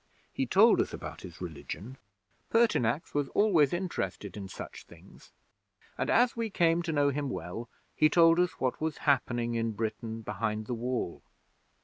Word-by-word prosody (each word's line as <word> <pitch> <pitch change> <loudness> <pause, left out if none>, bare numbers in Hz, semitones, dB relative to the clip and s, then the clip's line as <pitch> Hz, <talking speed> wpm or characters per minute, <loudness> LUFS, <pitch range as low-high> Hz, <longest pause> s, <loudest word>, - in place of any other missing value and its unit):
He - - -1
told - - +6
us - - -3
about - - -7
his 85 -2 -10
religion 90 - -7 0.5
(Pertinax 165 - +2
was 145 -1 0
always 175 -10 +4
interested 105 - -3
in 100 -2 -6
such 95 - -9
things), - - -17 0.6
and - - -2
as 245 +1 +4
we 230 -1 -2
came 170 -3 +2
to 170 -1 -3
know 145 -2 +3
him 140 0 -2
well, 115 +5 -5 0.3
he 155 - +5
told 165 +1 +5
us 180 0 +2
what 130 +2 -1
was 160 0 -1
happening 120 -4 +1
in 115 -1 -1
Britain 110 +1 -4
behind 110 +1 -2
the 120 - -3
Wall. 120 -6 -3
130 Hz, 160 wpm, -30 LUFS, 110-165 Hz, 0.6 s, told